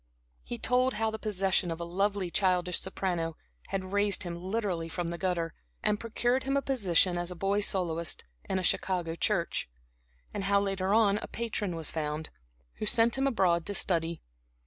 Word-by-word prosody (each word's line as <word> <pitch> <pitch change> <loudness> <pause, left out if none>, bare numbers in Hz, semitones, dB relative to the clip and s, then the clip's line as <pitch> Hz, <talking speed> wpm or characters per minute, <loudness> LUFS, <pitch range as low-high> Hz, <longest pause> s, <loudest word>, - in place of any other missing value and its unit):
He 240 - -5
told 250 +2 +2
how 220 +1 0
the 220 - -5
possession 195 -4 +1
of 165 0 -3
a - - -3
lovely 195 +1 0
childish 180 -2 +2
soprano 170 -4 -2 0.3
had 190 -1 -3
raised 205 0 +2
him 175 -2 -4
literally 185 -2 -2
from 175 0 -3
the 170 - -4
gutter, 170 -3 -1 0.3
and 210 - +2
procured 240 +3 0
him 275 +1 +1
a - - +2
position 185 -8 +2
as 175 +1 -3
boy 195 +3 0
soloist 170 -5 0 0.3
in 190 - +1
a 185 - -1
Chicago 175 -2 +1
church, 170 - 0 0.6
and 195 - -3
how, 200 0 +4
later 195 -1 -1
on, 210 -1 +4
a - - -6
patron 215 -6 -2
was 160 -2 -1
found, 155 0 -3 0.5
who 215 - -2
sent 230 +2 +4
him 270 +1 +1
abroad 185 -9 +2
to 205 - -2
study. 170 -3 +1
190 Hz, 175 wpm, -30 LUFS, 170-210 Hz, 0.6 s, how